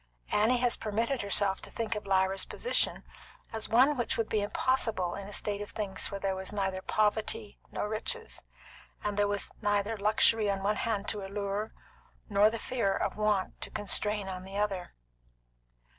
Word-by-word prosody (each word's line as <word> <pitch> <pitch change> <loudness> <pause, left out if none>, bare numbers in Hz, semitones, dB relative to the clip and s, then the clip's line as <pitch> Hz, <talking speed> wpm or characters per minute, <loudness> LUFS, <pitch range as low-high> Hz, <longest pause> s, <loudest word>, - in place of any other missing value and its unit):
Annie 225 +4 +4
has 245 -1 +2
permitted 230 +4 -1
herself 200 -1 +2
to - - -9
think 230 -1 -2
of 210 -2 -5
Lyra's 190 0 +2
position - - 0 0.5
as 220 -1 -3
one 260 +6 +5
which 240 -4 -1
would 225 -1 0
be 215 - +1
impossible 210 -4 +1
in 200 -1 -6
a - - -8
state 205 0 -1
of 205 - -6
things 205 -3 -2
where 200 - -4
there 195 -1 0
was 190 0 -4
neither 190 -2 -1
poverty 215 +1 0
nor - - -2
riches, 445 - -1 0.6
and 205 -1 -1
there 205 0 +3
was 205 0 -1
neither 205 +1 +1
luxury 215 +1 +3
on 195 -1 -1
one 210 +1 +1
hand 210 -3 -1
to 210 -2 -2
allure, 200 +2 -3 0.6
nor 205 +1 +5
the 230 - -3
fear 230 -4 0
of - - -1
want 210 -3 0
to - - -4
constrain 205 0 +1
on 185 -1 -5
the 195 +1 -7
other. 195 -4 -2
205 Hz, 175 wpm, -31 LUFS, 200-220 Hz, 0.6 s, one